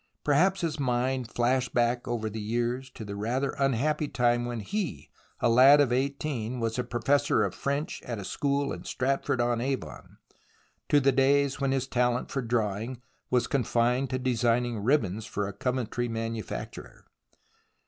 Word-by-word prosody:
Perhaps 180 +7 +3
his 160 -3 -2
mind 125 -1 0
flashed 125 +2 0
back 120 0 +1
over 115 -2 -2
the 110 0 -5
years 120 +4 -2
to 110 - -9
the 100 0 -6
rather 125 +7 -1
unhappy 140 +3 +1
time 120 -2 +1
when 120 -1 -3
he, 190 - -4 0.3
a - - +2
lad 130 +5 +7
of 135 -4 +3
eighteen, 130 -3 -2
was 115 +1 -1
professor 135 +1 +2
of 95 -3 -1
French 140 +2 -3
at 120 -2 -5
a 100 - -6
school 140 +3 -1
in - - -7
Stratford 130 -1 -1
on 120 -1 +1
Avon, 135 0 -4 0.7
to 145 - +5
the 135 0 +3
days 135 +1 +2
when 135 -1 +1
his 135 -1 0
talent 125 -1 0
for 135 - -1
drawing 115 0 -2 0.3
was 125 -1 +2
confined 125 0 +1
to 130 - -1
designing 120 -2 +1
ribbons 110 -5 +1
for 100 -1 -2
a 100 - -6
Coventry 125 +1 -2
manu 115 -1 -3
facturer. 95 - -8
125 Hz, 160 wpm, -28 LUFS, 115-135 Hz, 0.7 s, lad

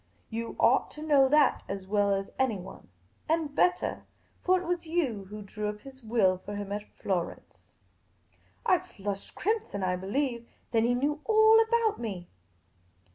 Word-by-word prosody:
You 230 +1 -4
ought - - +4
to 300 - -8
know 280 -4 +5
that 295 -1 +4
as 195 -1 -4
well 205 +1 +2
as 195 0 -1
anyone 215 -8 -2 0.2
— 95 - -36
and 320 -3 0
bettah; 360 +4 +1 0.4
for 370 0 +4
it 365 - -7
was 345 -1 -2
you 275 - -1
who 210 +2 -8
drew 210 +1 -4
up 210 0 -7
his 270 -1 -13
will 215 -5 +2
for 205 +2 -7
him 205 -1 -5
at 205 +1 -2 0.2
Florence." 180 -3 -4 1.0
I 365 - +4
flushed 200 - -6
crimson, 415 - -1
I 180 0 +1
believe. 235 +5 -2 0.2
Then 225 -1 +3
he 245 +1 +2
knew 295 +4 -1
all 440 0 +6
about 450 -1 +1
me 195 -7 -5
235 Hz, 165 wpm, -29 LUFS, 200-315 Hz, 1.0 s, all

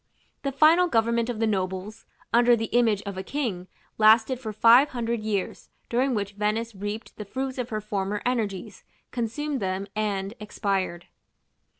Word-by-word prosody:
The 275 - -2
final 315 +6 +5
government 235 -3 +1
of 235 -3 -3
the 225 - +2
nobles, 190 0 -3 0.3
under 240 +1 +6
the 225 -1 -4
image 220 -4 +3
of 200 -2 -5
a - - -2
king, 200 -8 -3 0.3
lasted 225 +4 +5
for 220 -4 -5
five 235 +6 +6
hundred 235 -2 -2
years, 210 -3 -3 0.2
during 255 +2 +1
which 200 -1 -2
Venice 215 +3 -1
reaped 205 +3 -6
the 210 - -5
fruits 260 +4 -4
of 245 -1 -3
her 215 -2 -3
former 205 -1 -2
energies, 215 -7 -2 0.3
consumed 265 +5 -2
them, 190 0 -2
and 200 -2 -2
expired. 195 -4 -2
220 Hz, 160 wpm, -26 LUFS, 200-245 Hz, 0.3 s, under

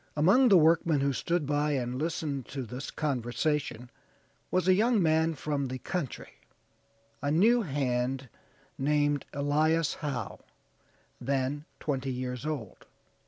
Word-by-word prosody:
"Among 205 - +5
the 195 - +8
workmen 160 -2 +4
who 140 0 +1
stood 170 +4 -1
by 145 +1 +1
and 125 -1 -2
listened 150 -4 -2
to 135 -2 -5
this 125 +4 -6
conversation 130 -2 -2 0.6
was 185 0 +1
a 185 - +7
young 225 +4 +3
man 160 -1 +2
from 145 -1 -2
the 130 +1 -4
country, 155 -1 -5 0.8
a 145 - -1
new 220 +11 +4
hand 135 - -1 0.5
named 145 0 +1
Elias 155 +3 +1
Howe, 145 -5 -4 0.8
then 135 +3 -1
twenty 135 -2 -2
years 125 +2 -4
old. 145 -8 -5
145 Hz, 125 wpm, -29 LUFS, 130-160 Hz, 0.8 s, the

